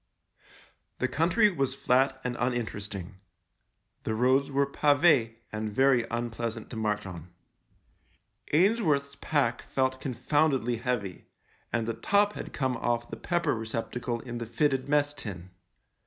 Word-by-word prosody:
The 130 - 0
country 175 - +3
was 135 -5 -1
flat 135 0 +2
and 125 -1 -2
uninteresting. 105 -6 -3 0.8
The 110 - -2
roads 130 +4 +3
were 140 0 +2
pave 140 -5 +3 0.2
and 110 0 -3
very 125 0 +3
unpleasant 115 -1 -4
to - - -6
march 105 -2 -1
on. 90 -2 -8 1.2
Ainsworth's 155 -6 +2
pack 140 -7 0
felt 130 0 0
con 130 -4 -3
foundedly 135 -5 +1
heavy, 115 -8 -3 0.4
and 115 -1 0
the 115 - 0
top 205 - +2
had - - -7
come 130 -3 -1
off 120 0 -1
the - - -3
pepper 175 +9 0
receptacle 115 +1 -3
in 120 -2 -6
the 115 - -5
fitted 135 +3 0
mess 145 0 +2
tin. 95 -9 -7
125 Hz, 135 wpm, -28 LUFS, 115-140 Hz, 1.2 s, country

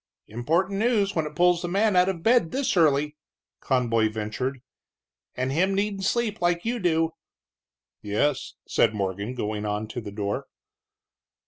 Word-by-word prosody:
"Important 170 - 0
news 215 -4 +2
when 160 -2 0
it 150 - -10
pulls 175 0 +3
a - - -1
man 200 +3 +2
out 180 +1 +5
of 170 -4 -4
bed 235 -7 +4
this 270 +1 -1
early," 150 -2 +3 0.4
Conboy 115 -4 +1
ventured, 115 +5 -4 0.7
"and 130 +1 -1
him 185 +7 +2
needin' 200 0 -1
sleep 220 +1 0
like 175 +1 +1
you 240 +1 -1
do." 165 -3 +1 0.9
"Yes," 125 +7 -1
said 110 -1 +2
Morgan, 100 +4 -3
going 105 -3 -3
on 105 +1 -2
to 120 - -5
the 105 - -7
door. 100 0 -3
160 Hz, 150 wpm, -25 LUFS, -, 0.9 s, out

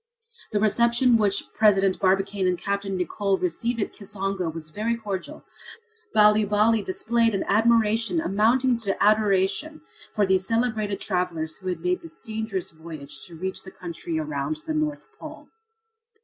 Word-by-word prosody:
The 210 - +1
reception 235 +3 +3
which 210 -3 +2
President 195 -3 +3
Barbicane 195 0 +1
and 180 -1 +1
Capt. 200 +2 -2
Nicholl 195 +1 -1
received 230 +8 -2
at 205 - -2
Kisongo 195 -3 -3
was 155 -1 -8
very 220 +7 -1
cordial. 205 -5 -6 0.7
Bali 210 0 +5
Bali 210 +2 +3
displayed 225 +3 +1
an 195 - -1
admiration 225 - +3
amounting 245 0 +2
to 200 -4 -2
adoration 210 +7 +2 0.3
for 210 - +2
these 190 0 +2
celebrated 220 -4 0
travellers 175 -5 -2
who 185 - -10
had 180 - -2
made 360 0 0
this 335 0 -11
dangerous 220 -4 -4
voyage 155 -3 -8
to 170 - -12
reach 190 +3 -4
the 190 - -11
country 185 - -6
around 315 0 -2
the 315 - -2
North 305 -1 -2
Pole. - - -10
205 Hz, 150 wpm, -25 LUFS, 190-230 Hz, 0.7 s, Bali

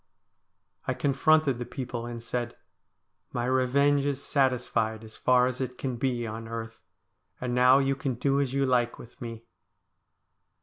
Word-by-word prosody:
I - - 0
confronted 145 -1 +3
the 120 - -3
people 120 -2 -5
and 120 -1 -6
said: 120 0 -3 0.4
' - - -50
My 120 -1 -1
revenge 135 +3 +3
is 140 -1 -1
satisfied, 125 -6 0
as 110 0 -12
far 125 -1 +4
as 125 +1 -2
it 125 -1 -4
can 130 -3 -3
be 120 -1 -1
on 115 +1 -6
earth. 115 0 -6 0.6
And 125 -1 -2
now 125 +1 +6
you 135 0 +2
can 135 -2 -2
do 140 +3 +1
as 135 -3 -1
you 135 0 +1
like 120 -2 +1
with 120 - -14
me.' 115 -2 -6
125 Hz, 165 wpm, -28 LUFS, 120-135 Hz, 0.6 s, now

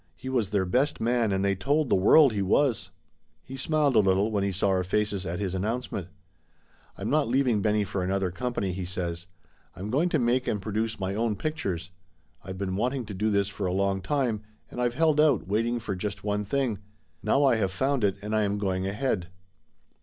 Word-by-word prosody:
He 130 - -7
was 120 -7 0
their 100 -2 +1
best 130 +10 +1
man 115 -2 +1
and 95 0 0
they 100 - +2
told 145 +10 +1
the - - +6
world 125 +8 +6
he 100 - -1
was. 105 0 +1 0.5
He 135 - -9
smiled 145 0 +1
a - - +7
little 100 +2 +2
when 100 -2 0
he 100 - 0
saw 95 +2 +1
our 95 -1 +2
faces 100 0 -1
at 85 +2 -3
his 95 -2 -2
announcement. 105 -1 -3 0.9
"I'm 100 - -3
not 150 -2 +2
leaving 125 -3 +2
Benny 105 0 +2
for 95 -1 -3
another 95 0 0
company," 110 -1 -2
he 90 +1 -4
says. 90 -1 -4 0.5
"I'm 95 +4 -5
going 155 +8 +2
to 160 - +2
make 125 0 +1
and 105 - 0
produce 110 +2 -2
my 95 0 -2
own 110 0 0
pic 155 +9 -3
tures. 90 - -3 0.5
I've 95 0 -7
been 95 -1 -2
wanting 125 +3 -1
to 105 - -7
do 105 +3 0
this 100 -1 +2
for 100 -1 -3
a 90 - -1
long 100 0 0
time, 120 0 0 0.3
and 125 - -4
I've 120 -1 0
held 155 0 +3
out, 140 - +3
waiting 115 +4 0
for 100 -3 -4
just 100 +1 -4
one 105 0 -1
thing. 125 -2 -1 0.4
Now 135 +8 +3
I 130 -4 +4
have 95 -3 0
found 135 +4 0
it, 100 -1 +2
and 105 +1 -2
I 110 - +3
am 100 0 0
going 95 -2 -1
ahead." 100 -3 -1
105 Hz, 215 wpm, -27 LUFS, 95-125 Hz, 0.9 s, a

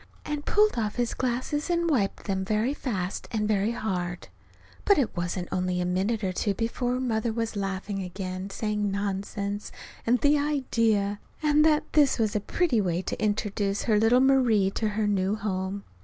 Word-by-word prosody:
and 295 -1 -4
pulled 425 - +3
off 210 -2 -2
his 240 -1 0
glasses 255 +5 -2
and 340 -1 +1
wiped 235 -11 0
them 190 -1 -1
very 215 +7 0
fast 195 -10 -3
and 215 -2 -1
very 210 0 +2
hard. 180 -6 -3 0.5
But 405 - +4
it 260 -6 0
wasn't 175 0 -2
only 180 -1 0
a 180 - 0
minute 195 +5 0
or 185 -1 0
two 200 +2 0
before 245 +3 -1
Mother 230 -2 0
was 225 0 -2
laughing 195 0 -3
again, 185 0 -5
and 195 +1 -6
saying, 210 0 -1
"Nonsense!" 200 +1 -3 0.4
and 245 +2 +4
"The 290 +4 +4
idea!" 230 -8 +1 0.2
and 300 0 +4
that 305 -1 +4
this 295 -3 +4
was 220 -3 0
a - - +3
pretty 245 - +1
way 180 -1 -1
to - - -4
introduce 205 -1 0
her 215 -3 +3
little 230 +3 +5
Marie 245 -8 +4
to 215 +1 -1
her 210 +1 -1
new 200 0 +1
home! 200 -1 -3
210 Hz, 180 wpm, -27 LUFS, 195-245 Hz, 0.5 s, little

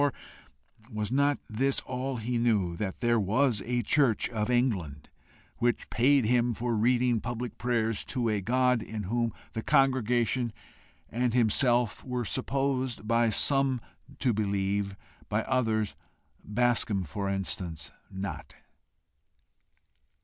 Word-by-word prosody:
Or 145 -2 +2 0.8
was 105 0 -3
not 140 +2 +3
this 130 +5 +1
all 130 +1 -3
he 120 +2 -2
knew 105 -8 +1
that 95 +3 -4
there 120 -1 +3
was 110 +2 +2
a 120 0 -1
church 125 -2 +2
of 110 -2 -2
England, 100 - 0 0.5
which 120 0 0
paid 135 +1 +4
him 120 0 +2
for 120 +1 -1
reading 120 +1 +2
public 120 0 -5
prayers 115 -3 0
to 125 -3 -1
a 105 -2 0
God 125 +2 +2
in 110 -1 -5
whom 115 +4 0 0.2
the 115 - -3
congregation 125 -2 +2 0.5
and 120 0 -1
himself 120 0 +2
were 125 -2 -3
supposed 130 -3 -1
by 115 0 +3
some 135 +3 +2 0.4
to 125 -3 +1
believe, 100 -1 -1 0.3
by - - 0
others, 110 -5 0 0.5
Bascombe, 110 -3 +1
for 100 +6 -3
instance, 95 -4 -3 0.2
not? 95 0 -6
120 Hz, 125 wpm, -29 LUFS, 105-125 Hz, 0.8 s, paid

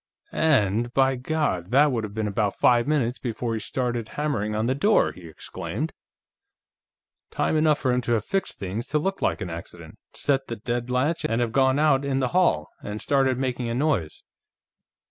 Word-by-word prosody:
"And, 120 -6 +2
by 135 0 +3
God, 125 - -1
that 145 +4 +4
would 115 -3 -1
have 105 -1 -6
been 110 -1 -1
about 100 0 0
five 120 0 +3
minutes 130 -5 0
before 120 -1 -3
he 110 - -2
started 120 0 -2
hammering 135 -9 -1
on 110 +1 0
the 130 - +1
door!" 205 +11 +3
he 90 -2 -12
exclaimed. 120 - -5 1.4
"Time - - 0
enough 155 -1 +3
for 130 -3 0
him 125 - +1
to 120 -1 -1
have 110 -2 0
fixed 195 0 -2
things 100 +6 -4
to 155 - 0
look 195 +6 -2
like - - 0
an 90 -2 -4
accident, 85 0 -9 0.2
set 135 -1 0
the 115 - -4
deadlatch, 125 +7 -1
and 115 +1 0
have 120 -2 0
gone 130 +2 +3
out 145 -2 +3
in 140 -1 -1
the 130 -2 0
hall, 175 - +2
and 105 +1 -5
started 135 -1 +2
making 125 -2 -2
a 115 - -2
noise. 130 - -1
125 Hz, 185 wpm, -25 LUFS, 110-140 Hz, 1.4 s, that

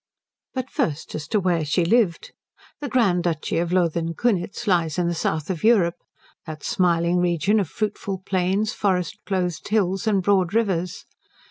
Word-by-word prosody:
But 260 0 -3
first 150 -1 -2
as 150 -1 -5
to 215 - +1
where 175 -4 +1
she 160 +4 +1
lived. 185 -3 +1 0.5
The 290 -2 -4
Grand 200 -9 +2
Duchy 165 -2 -1
of 170 0 -1
Lothen 170 -2 +1
Kunitz 210 0 -1
lies 170 -6 +1
in 175 -1 +1
the 170 - 0
south 160 0 -2
of 170 - -5
Europe; 190 -7 +3 0.5
that 155 -2 -7
smiling 175 -2 +2
region 175 +4 +2
of 190 -7 -1
fruitful 200 -3 -3
plains, 190 +3 0
forest 180 -5 -1
clothed 180 -4 -2
hills, 200 0 0
and 200 -3 +2
broad 190 -1 +2
rivers. 180 -6 0
180 Hz, 160 wpm, -23 LUFS, 170-205 Hz, 0.5 s, Europe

